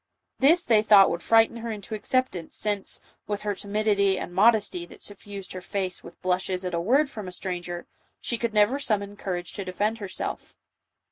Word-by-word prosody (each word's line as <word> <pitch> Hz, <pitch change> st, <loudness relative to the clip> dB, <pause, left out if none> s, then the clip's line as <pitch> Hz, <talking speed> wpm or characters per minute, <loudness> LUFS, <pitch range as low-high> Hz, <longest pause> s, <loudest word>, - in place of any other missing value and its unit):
This 330 Hz, +6 st, +5 dB
they 220 Hz, -3 st, +4 dB
thought 205 Hz, -3 st, +7 dB
would 170 Hz, -, -3 dB
frighten 225 Hz, +3 st, +4 dB
her 230 Hz, 0 st, -5 dB
into 210 Hz, 0 st, -7 dB
acceptance, 215 Hz, -5 st, -1 dB
since, 205 Hz, -2 st, -2 dB, 0.3 s
with 205 Hz, -1 st, -2 dB
her 210 Hz, -1 st, -1 dB
timidity 200 Hz, -1 st, +1 dB
and 175 Hz, -, -5 dB
mod 220 Hz, +5 st, +6 dB
esty 185 Hz, -4 st, -3 dB
that -, -, -12 dB
suffused 200 Hz, -1 st, -8 dB
her 185 Hz, -, -6 dB
face 185 Hz, -1 st, -3 dB
with 170 Hz, -, -13 dB
blushes 185 Hz, 0 st, 0 dB
at 180 Hz, -, -3 dB
a 170 Hz, -, 0 dB
word 270 Hz, -, +3 dB
from 215 Hz, -8 st, -7 dB
a -, -, -6 dB
stranger, 175 Hz, -1 st, -4 dB, 0.3 s
she 235 Hz, -, -3 dB
could 235 Hz, -1 st, -1 dB
never 215 Hz, +6 st, +3 dB
summon 205 Hz, -6 st, -1 dB
courage 180 Hz, -3 st, -4 dB
to 200 Hz, -, -4 dB
defend 205 Hz, +5 st, -1 dB
herself. 195 Hz, -3 st, -5 dB
205 Hz, 190 wpm, -26 LUFS, 185-220 Hz, 0.3 s, thought